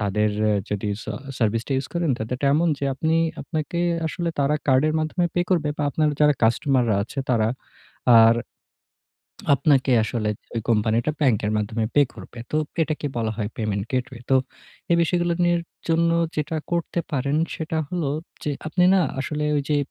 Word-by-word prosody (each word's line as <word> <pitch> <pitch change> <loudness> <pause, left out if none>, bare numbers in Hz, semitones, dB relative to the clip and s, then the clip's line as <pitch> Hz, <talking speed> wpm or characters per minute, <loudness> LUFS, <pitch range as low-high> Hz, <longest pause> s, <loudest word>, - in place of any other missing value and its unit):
তাদের 105 +1 +1 0.4
যেটি 105 0 -2
ছা 110 - -5 0.3
সার্ভিসটা 115 +3 0
ইউস 135 0 -2
করেন 170 -4 +1
তাদেরটা 125 +5 -2
এমন 170 +2 +3
যে, 140 - -3
আপনি 160 +3 0 0.3
আপনাকে 160 +2 -3 0.3
আসলে 170 +2 -2
তারা 145 +1 +2
কার্ডের 140 +4 +3
মাধ্যমে 165 +3 0
পে 175 - +2
করবে, 165 -5 +2
বা - - -2
আপনার 155 +2 +1
যারা 150 -1 +5
কাস্টমাররা 120 -1 +2
আছে 125 +6 -8
তারা 110 -2 +2 0.7
আর 115 +1 +6 1.2
আপনাকে 135 -1 +2
আসলে 110 -1 -2 0.3
ওই 115 - 0
কোম্পানিটা 115 +5 +2
ব্যাংকের 110 -7 +2
মাধ্যমে 110 +1 -1
পে 145 - +7
করবে। 120 - -11
তো 155 - +1 0.2
এটাকে 155 -1 -2
বলা 110 -1 0
হয় 105 -1 -2
পেমেন্ট 105 -3 -1
গেটওয়ে। 125 -1 -3
তো 135 - +5 0.6
এই 170 - +5
বিষয়গুলো 175 0 +1
নিয়ে 175 0 +3 0.3
জন্য 165 +1 +3 0.3
যেটা 155 +1 -2 0.2
করতে 170 0 -1
পারেন 140 +2 0 0.2
সেটা 160 0 -3
হলো 170 -6 -1 0.3
যে, 150 - -1 0.2
আপনি 180 +3 +1
না 190 - +4 0.2
আসলে 150 +2 -2
ওই 145 - +2
যে, 150 - +3
140 Hz, 165 wpm, -23 LUFS, 115-160 Hz, 1.2 s, পে